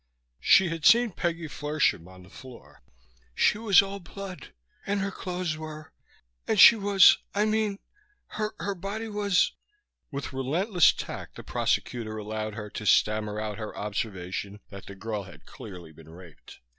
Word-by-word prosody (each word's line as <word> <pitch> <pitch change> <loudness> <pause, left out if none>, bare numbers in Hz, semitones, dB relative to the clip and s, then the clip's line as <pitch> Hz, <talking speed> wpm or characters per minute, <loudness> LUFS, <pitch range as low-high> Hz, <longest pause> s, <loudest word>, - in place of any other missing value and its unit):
She 185 - +5
had 165 -1 -5
seen 235 +3 +5
Peggy 170 -2 -3
Flershem 145 - -1
on 95 0 -14
the 90 - -17
floor. 130 +1 -14 0.5
"She 210 - +2
was 205 -4 +5
all 195 0 -6
blood. 190 0 -9 0.4
And 200 0 0
her 200 +1 -2
clothes 180 -4 -4
were 155 - -9 0.5
And 215 - +1
she 235 - +10
was, 195 -2 +5 0.2
I 205 +1 +2
mean 215 -2 0 0.5
her 215 0 -4
her 200 - -3
body 200 +5 -5
was 205 -3 +1 0.3
" 415 - -54
With 140 -1 -5
relentless 165 - +3
tact - - -8
the - - -9
prosecutor 110 -3 -2
allowed 110 0 -5
her 105 -2 -7
to 105 - -6
stammer 105 0 +2
out 105 0 -4
her 105 -1 -7
observation 100 -1 -4
that 100 -1 -11
the 100 - -9
girl 105 0 -5
had - - -15
clearly 90 -5 -11
been 80 0 -16
raped. 85 -4 -15
150 Hz, 160 wpm, -27 LUFS, -, 0.5 s, she